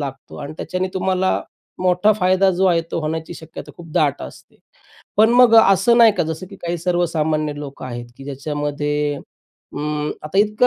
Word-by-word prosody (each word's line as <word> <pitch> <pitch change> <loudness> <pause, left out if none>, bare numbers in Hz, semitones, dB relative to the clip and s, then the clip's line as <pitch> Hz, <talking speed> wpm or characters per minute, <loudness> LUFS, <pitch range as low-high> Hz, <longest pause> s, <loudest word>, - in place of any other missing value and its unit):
लागतो 135 -2 -7
आणि 145 +1 -6
त्याच्याने 185 +2 -3
तुम्हाला 185 0 0 0.4
मोठा 185 +4 +3
फायदा 185 -1 +3
जो 185 +1 0
आहे 170 -2 +3
तो - - -2
होण्याची 160 +2 -4
शक्यता 160 -1 -10
खूप 165 -2 -12
दाट 145 -3 +1
असते. 65 - -12 0.6
पण 220 +2 +5
मग 245 -2 +6
असं 225 +3 +5
नाही 230 -2 +7
का? - - 0
जसं 160 +3 -5
की 195 - -10
काही 175 -1 -4
सर्वसामान्य 160 -3 0
लोकं 140 -2 -8
आहेत, 120 -1 -6
की 135 - -11
ज्याच्यामध्ये 145 +1 -2 0.6
अं, 150 0 -2
आता 155 +6 -2
इतकं 210 +4 +3
165 Hz, 170 wpm, -20 LUFS, 150-190 Hz, 0.6 s, नाही